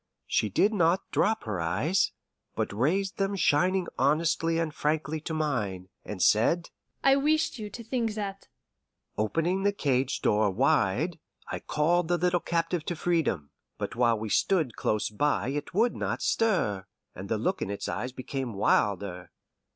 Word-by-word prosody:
She 105 - +1
did 200 - +2
not 175 -2 +1
drop 220 +1 +1
her 105 -5 -3
eyes, 115 - +1 0.4
but - - -2
raised 180 - 0
them 195 0 0
shining 185 +2 +2
honestly 165 +2 +2
and 165 -2 -1
frankly 155 +1 -1
to 160 - -5
mine, 105 -12 -2
and 95 -4 -3
said, 165 +11 +3 0.3
"I 270 0 +6
wished 310 -1 +1
you 210 -1 -5
to 235 +4 -8
think 230 -2 -1
that." 200 -2 -5 0.7
Opening 165 - 0
the 200 +1 +3
cage 135 -8 0
door 105 0 +3
wide, 140 - +1 0.3
I - - -3
called 165 +3 +1
the 175 +1 +2
little 175 +1 +2
captive 170 0 -1
to 175 - -2
freedom. 160 - 0 0.3
But - - -4
while 120 -1 +3
we 110 0 -5
stood 155 - +1
close 105 0 -1
by 145 +3 0
it 145 +1 -4
would 230 +4 +3
not - - -2
stir, 135 - +1 0.3
and 95 +2 -8
the 110 - +1
look 185 - -1
in - - -2
its 100 - -4
eyes 105 +9 -3
became 130 -2 -5
wilder. 95 -2 0
155 Hz, 160 wpm, -28 LUFS, -, 0.7 s, I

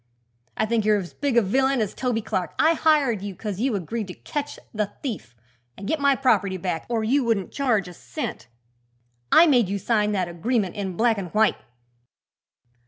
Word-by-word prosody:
"I - - +2
think 225 0 +1
you're 210 0 +3
as 185 -4 -6
big 280 -4 -1
a 235 - +6
villain 265 +6 +2
as 215 -3 -1
Toby 240 -3 -1
Clark. 195 -5 -3
I 320 +1 +4
hired 295 - +2
you 200 -1 -6
'cause 205 0 -5
you 250 -1 +1
agreed 205 +3 -3
to 180 - -8
catch 290 -1 -5 0.2
the 210 -2 -1
thief 200 - -5 0.4
and 195 - -7
get 315 - 0
my 280 -1 +4
property 200 -8 +2
back 180 -3 -3
or 230 -2 0
you 265 +5 +2
wouldn't 225 -5 0
charge 230 -9 +1
a 180 - -9
cent. 125 -4 -6 0.8
I 335 - +8
made 245 - +3
you 200 - -1
sign 210 +1 +1
that 185 -3 0
agreement 190 +3 -1
in 190 -4 -4
black 225 -2 +2
an' 185 - -4
white." 215 +5 +2
215 Hz, 190 wpm, -24 LUFS, 190-255 Hz, 0.8 s, I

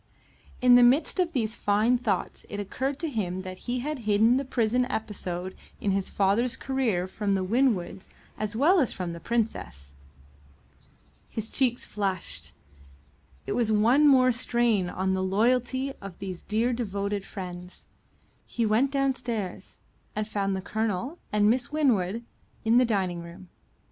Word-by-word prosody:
In 250 0 +7
the 245 - +8
midst 260 +10 +4
of 355 -2 +2
these 225 -8 -1
fine 215 +4 +2
thoughts 205 -6 -2
it 205 - -5
occurred 260 +7 -2
to 330 - -1
him 190 - -2
that 185 0 -8
he 245 0 0
had 300 +1 -3
hidden 220 +2 +3
the 275 - 0
prison 250 -1 +1
episode 190 -6 -4 0.3
in 200 - 0
his 195 0 -1
father's 205 +5 +1
career 235 -10 0
from 200 +1 -2
the 190 -1 +1
Winwoods 195 -4 0 0.3
as 215 +1 -3
well 330 - +4
as 265 - +2
from 180 -2 -4
the 170 - -7
Princess. 90 - -3 1.4
His 220 0 -5
cheeks 250 -3 +1
flushed; 195 -4 -3 0.9
it - - -4
was 225 -1 +1
one 235 +8 +5
more 255 -2 +6
strain 235 -5 +1
on 190 +1 -1
the 190 - 0
loyalty 250 +7 +1
of 195 -3 -9
these 185 -3 -6
dear 230 +4 0
devoted 200 -3 -2
friends. 180 -2 -8 0.6
He 235 - -1
went 220 +6 +3
downstairs, 250 -8 -2 0.3
and 215 0 -2
found 195 -2 -1
the 190 - -4
Colonel 220 - -2
and 210 0 +3
Miss 245 +4 +1
Winwood 235 -8 +1 0.4
in 225 +2 +4
the 250 - +4
dining 190 -6 -1
room. 175 +2 -12
215 Hz, 155 wpm, -27 LUFS, 190-250 Hz, 1.4 s, the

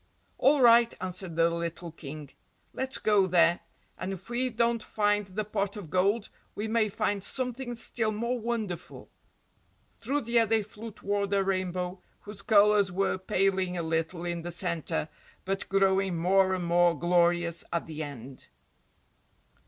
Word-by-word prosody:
"All 280 +1 +4
right," 235 0 +7
answered 185 -2 -4
the 165 0 +4
little 170 0 -4
King, 150 -2 -9 0.4
"let's 265 0 0
go 205 -3 +3
there, 175 -1 +4 0.4
and 185 +2 -3
if 195 +5 -10
we 255 +2 0
don't 235 0 +1
find 205 -1 0
the 205 +3 -4
pot 205 0 -2
of 175 -7 -9
gold 200 +4 +1 0.3
we 210 - -3
may 220 -1 +2
find 200 0 -1
something 250 0 -3
still 225 -1 -2
more 235 +4 -2
wonderful." 220 -7 -5 0.9
Through 290 +2 -1
the 235 0 +2
air 225 - +3
they 220 0 +2
flew 215 +2 -9
toward 200 0 -2
the 200 0 +2
rainbow, 185 -1 -2 0.2
whose 205 -1 -6
colours 205 -2 +4
were 190 +1 0
paling 190 -1 0
a 170 - -2
little 165 +2 -2
in 170 -1 -3
the 175 - -5
center, 170 -3 -2 0.4
but 195 +1 -3
growing 195 -2 +2
more 190 +2 +3
and 180 -2 -3
more 170 -1 +3
glorious 175 0 +2
at 170 - -1
the 155 -1 -6
end. 135 -3 -8
195 Hz, 155 wpm, -28 LUFS, 175-215 Hz, 0.9 s, right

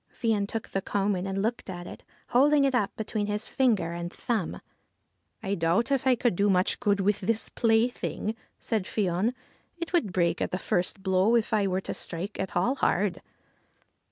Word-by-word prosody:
Fion 215 -4 0
took 225 +1 -5
the 195 - -1
coman 195 -1 -1
and 195 +1 -1
looked 230 -1 -2
at 175 -1 -6
it, - - -10 0.3
holding 285 +3 +5
it 275 -1 +2
up 210 -6 +2
between 215 -1 -2
his 210 +1 -2
finger 220 -11 +1
and 170 0 -4
thumb. 225 -8 -2 0.4
' - - -43
I 195 -1 -1
doubt 175 +9 +1
if 270 -1 +1
I 255 - +6
could 240 -4 +1
do 200 +3 +2
much 185 -1 +2
good 205 -4 +2
with 200 +1 +1
this 225 +3 0
plaything," 225 -1 +1 0.3
said 220 -5 -1
Fion; 200 +4 0 0.2
' - - -38
it 335 +1 -5
would 260 - +2
break 170 -1 +1
at 185 - -1
first 180 +2 -1
blow 190 +4 +3
if 230 -2 +1
I 205 -2 +3
were 190 0 0
to - - -4
strike 180 +5 -5
at 190 - -3
all 185 +9 +2
hard.' 195 -6 +1
205 Hz, 190 wpm, -28 LUFS, 185-230 Hz, 0.4 s, I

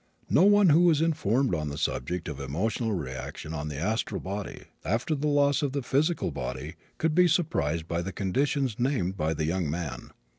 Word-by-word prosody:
No - - +5
one 205 -2 +6
who 170 +4 +6
is 155 -3 +3
informed 140 - +1
on 75 -3 -1
the 70 - -5
subject 85 +5 -2
of 75 -4 -5
emotional 100 - -1
reaction 70 0 -5
on 75 -1 -4
the 75 -2 -5
astral 105 +4 -1
body, 100 +1 -5 0.2
after 115 - 0
the 150 0 -1
loss 145 0 +3
of 140 -3 -1
the 140 -2 -2
physical 155 +7 +1
body, 65 +6 -5 0.2
could 160 -1 +1
be 180 +2 +5
surprised 85 - 0
by 85 0 -1
the 95 +3 -4
conditions 130 +5 0
named 120 -8 0
by 80 -2 -1
the 80 - -1
young 85 -1 -1
man. 75 -7 -4
100 Hz, 190 wpm, -28 LUFS, -, 0.2 s, one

